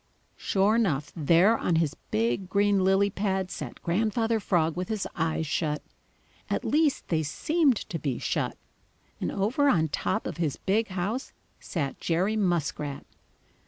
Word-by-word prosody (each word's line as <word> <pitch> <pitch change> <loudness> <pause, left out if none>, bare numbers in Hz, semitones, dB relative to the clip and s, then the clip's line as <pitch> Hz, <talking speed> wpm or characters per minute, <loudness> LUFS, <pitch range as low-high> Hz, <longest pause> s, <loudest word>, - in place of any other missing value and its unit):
Sure 200 +3 +2
enough, 160 -11 0
there 170 +7 +4
on 175 - +1
his 160 -3 +1 0.2
big 120 - 0
green 200 -1 +3
lily 195 +2 +3
pad 190 -2 -1
sat - - -6
Grandfather 220 +5 +1
Frog 165 -5 +1
with 180 +1 -3
his 215 -3 -2
eyes 160 0 0
shut. 150 0 -1 0.7
At - - -1
least, 300 -1 +1
they 160 -2 +2
seemed 285 - +2
to 165 - -5
be 135 -4 -2
shut. - - -2 0.6
And - - -2
over 250 +9 +2
on 160 - +3
top 215 +8 -1
of - - -4
his 160 -5 -1
big 220 +4 +1
house 195 +8 -3 0.3
sat 145 -6 -3
Jerry 185 +6 +1
Muskrat. 165 -7 -1
185 Hz, 150 wpm, -27 LUFS, 160-215 Hz, 0.7 s, there